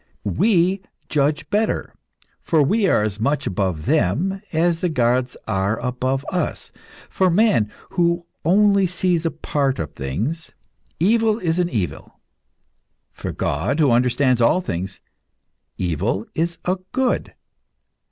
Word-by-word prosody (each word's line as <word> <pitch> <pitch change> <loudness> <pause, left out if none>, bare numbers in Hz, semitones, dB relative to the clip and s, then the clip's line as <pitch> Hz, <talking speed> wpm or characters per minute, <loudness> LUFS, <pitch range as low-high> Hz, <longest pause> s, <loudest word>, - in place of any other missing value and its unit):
We 185 - +2 0.3
judge 145 0 +1
better, 215 +1 0 0.5
for 160 -3 +3
we 200 +8 +2
are 105 - +3
as 105 -1 -3
much 140 +6 0
above 90 -5 -1
them 185 - +1
as 165 +1 +1
the 180 - 0
gods 125 -3 +1
are 100 +2 0
above 130 +2 -2
us. 180 - -3 0.4
For 190 -1 +1
man, 180 - +3 0.2
who 170 -2 +1 0.2
only 200 +2 +4
sees 175 -1 0
a - - +1
part 145 -4 -1
of 75 -2 -4
things, 115 - -4 0.5
evil 220 +4 +3
is 170 -5 -1
an 175 -1 +1
evil; 100 - -4 0.9
for - - -5
God, 95 - -1
who 145 -5 +4
understands 125 +1 +2
all 115 +10 +4
things, 95 - -4 0.8
evil 90 +4 -1
is 170 +1 -1
a 185 +1 +1 0.2
good. 260 -1 0
155 Hz, 130 wpm, -21 LUFS, 115-180 Hz, 0.9 s, only